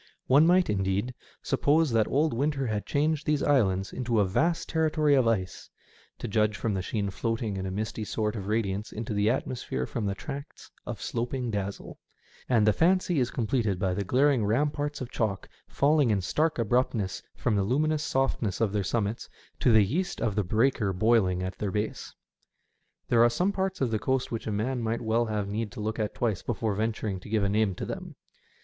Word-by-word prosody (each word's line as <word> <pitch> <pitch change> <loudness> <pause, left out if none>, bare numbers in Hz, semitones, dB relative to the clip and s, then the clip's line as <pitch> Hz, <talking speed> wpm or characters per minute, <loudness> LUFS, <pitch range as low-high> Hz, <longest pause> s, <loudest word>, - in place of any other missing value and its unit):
One 145 +5 +5
might, 180 +1 +4
indeed, 100 +4 -1 0.3
suppose 155 0 +2
that 115 -2 +3
old 150 +2 +1
winter 135 +2 0
had 110 -3 -2
changed 155 +2 0
these 150 -2 +1
islands 95 -9 +2
into 120 -3 0
a 100 - +4
vast 165 - 0
terri 160 -1 +2
tory 150 -2 +3
of 130 -4 +4
ice, 95 -5 -1 0.5
to - - -5
judge 105 0 +1
from 110 +2 -1
the 95 - -1
sheen 100 +1 -2
floating 115 0 -2
in 95 0 -3
a - - -4
misty 110 +2 -3
sort 105 +1 -2
of 100 -3 -5
radiance 105 -1 -1
into 110 0 -4
the 105 +1 +2
atmosphere 120 - -2
from 105 - -3
the 100 - -1
tracts 140 +6 -8 0.2
of - - -5
sloping 120 +1 -2
dazzle; 100 -1 -5 0.5
and 115 -4 +4
the 105 - +4
fancy 180 - +2
is 125 -1 +1
completed 110 -4 0
by 95 0 0
the 100 - -2
glaring 130 +4 +3
ramparts 145 +6 0
of 125 - -5
chalk 100 -5 -2 0.2
falling 145 -2 +3
in 105 -2 +2
stark 155 - 0
abruptness 115 -3 0
from 110 - 0
the 100 - +2
luminous 150 +9 +1
softness 135 -9 0
on 110 -3 +1
their 105 -1 0
summits 105 +2 -2 0.3
to 125 - +3
the 110 -2 +6
yeast 175 - -2
of 115 -4 0
the 105 +1 0
breaker 110 +1 +1
boiling 95 -3 +2
at 95 +1 -5
their 105 - -1
base. 105 +3 -3 1.0
There 115 -1 +5
are 120 - +6
some 180 +11 +1
parts 190 -3 -2
of 125 -4 +1
the 110 - 0
coast 130 +2 -1
which 115 -1 -4
a - - -1
man 120 +5 -1
might 115 0 -1
well 115 +1 +1
have 105 -2 -2
need 105 +1 -3
to - - -8
look 110 +2 -3
at 105 -1 -2
twice 110 -6 -1
before 110 -2 -2
venturing 110 -2 -2
to 90 - -12
give 105 -1 +1
a - - +2
name 105 -2 +1
to - - -5
them. - - -7
115 Hz, 205 wpm, -28 LUFS, 105-135 Hz, 1.0 s, the